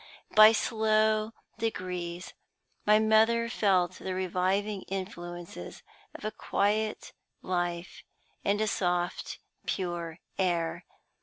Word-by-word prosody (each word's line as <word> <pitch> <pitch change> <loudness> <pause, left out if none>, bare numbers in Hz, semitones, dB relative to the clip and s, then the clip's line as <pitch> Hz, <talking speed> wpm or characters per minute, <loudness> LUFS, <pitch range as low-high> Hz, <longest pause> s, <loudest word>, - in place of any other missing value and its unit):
By 215 0 +10
slow 215 -1 +2 0.3
degrees 180 -5 -3 0.5
my 210 0 +7
mother 220 +2 +4
felt 185 -5 +2
the 185 -1 -4
reviving 190 +2 0
influences 175 - -6 0.3
of - - -8
a 215 - -1
quiet 215 +1 -1 0.3
life 175 0 -2 0.4
and 200 +1 +1
a - - +3
soft, 180 -2 -1 0.3
pure 175 -3 -3 0.2
air. 170 -3 0
190 Hz, 95 wpm, -29 LUFS, 175-215 Hz, 0.5 s, By